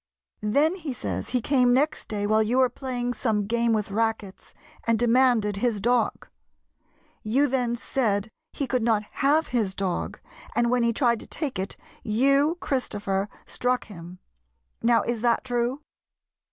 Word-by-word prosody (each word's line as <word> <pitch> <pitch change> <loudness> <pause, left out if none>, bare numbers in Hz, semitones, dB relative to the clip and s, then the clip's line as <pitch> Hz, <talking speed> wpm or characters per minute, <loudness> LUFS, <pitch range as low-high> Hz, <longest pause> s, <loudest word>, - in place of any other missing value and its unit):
Then, 315 +6 +3
he 315 -7 -5
says, - - -4
he 250 -1 0
came 250 -1 +3
next 300 +4 0
day 205 -1 -2
while 215 +1 +3
you 225 +4 +1
were 260 -1 +4
playing 245 -2 -3
some 215 -4 0
game 235 +2 +1
with 210 -2 0
rackets, 220 -2 -2 0.4
and 230 -1 +3
demanded 235 -3 +3
his 225 0 0
dog. 240 +3 0 0.9
You 255 +7 +2
then 250 -3 0
said 220 -4 -1 0.2
he 280 - -2
could 255 -1 0
not 220 -2 +2 0.2
have 300 +4 +3
his 215 -6 0
dog, 190 -3 -3 0.4
and, 235 0 +2
when 250 -1 +2
he 235 0 +3
tried 235 -1 +2
to - - -11
take 280 - -4
it, 190 - -4 0.2
you, 275 +8 +2
Christopher, 205 - -2 0.2
struck 250 0 -1
him. 175 -3 -10 0.6
Now, 230 -2 +3
is 235 -2 -2
that 235 -1 +2
true 245 +2 -1
235 Hz, 155 wpm, -25 LUFS, 215-260 Hz, 0.9 s, were